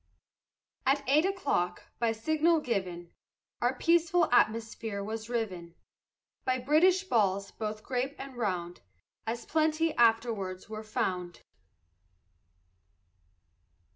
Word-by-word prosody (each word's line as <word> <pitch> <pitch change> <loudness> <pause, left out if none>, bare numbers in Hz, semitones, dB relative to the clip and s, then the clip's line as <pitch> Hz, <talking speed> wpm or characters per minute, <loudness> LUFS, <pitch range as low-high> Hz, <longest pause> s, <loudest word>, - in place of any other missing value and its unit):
At 275 +2 +2
eight 300 +5 +4
o'clock, 285 - -1 0.2
by 235 -1 +2
signal 315 +8 +2
given, 180 - -3 0.5
Our 245 +2 +2
peaceful 340 +2 +3
atmosphere 225 -3 +1
was 220 +2 -5
riven 185 -8 -3 0.7
By 255 0 +1
British 320 +9 +4
balls, 200 - +1
both 215 -1 -5
grape 260 +2 -2
and 270 -1 -8
round, 180 -7 -3 0.5
As 230 +1 -3
plenty 315 +1 +1
afterwards 225 -5 +1
were 215 0 -6
found. 180 -5 -3
230 Hz, 100 wpm, -30 LUFS, 200-290 Hz, 0.7 s, eight